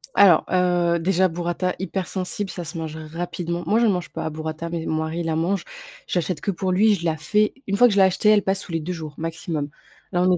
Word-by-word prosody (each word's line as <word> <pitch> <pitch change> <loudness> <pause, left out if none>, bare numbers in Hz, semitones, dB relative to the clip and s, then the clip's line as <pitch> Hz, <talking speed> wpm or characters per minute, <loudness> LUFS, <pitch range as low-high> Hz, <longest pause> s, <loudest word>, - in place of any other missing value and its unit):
Alors, 180 -5 +6
heu, 175 -2 +2
déjà, 185 +2 +3
Burrata 175 +1 -2
hypersensible, 190 +1 -3
ça 175 - -5
se 165 +1 -7
mange 160 -1 -5
rapidement. 170 +2 -4
Moi 215 +7 +3
j'en 235 -2 +4
mange 180 -3 -1
pas, 160 - -4
Burrata, 160 +1 -5
mais 165 -1 -3
mon 160 0 0
mari 160 +2 -3
il 165 -1 -2
en - - 0
mange. 175 +4 0 0.4
J'achète 175 -2 -1
que 200 - 0
pour 185 0 -2
lui, 210 +3 +4
je 170 -3 -6
la 160 -1 +1
fais, 210 +8 +1
une 200 - 0
fois 245 - +7
que 225 - +1
je - - 0
l'ai - - +8
acheté 190 +3 +3
elle 210 -1 +6
passe 195 0 0
sous 185 - -10
les 165 - 0
2 170 +4 -4
jours 155 -3 -7
maximum, 160 -2 -3 0.4
là 175 -2 +1
on 185 +1 +4
est - - +2
175 Hz, 250 wpm, -23 LUFS, 165-190 Hz, 0.4 s, l'ai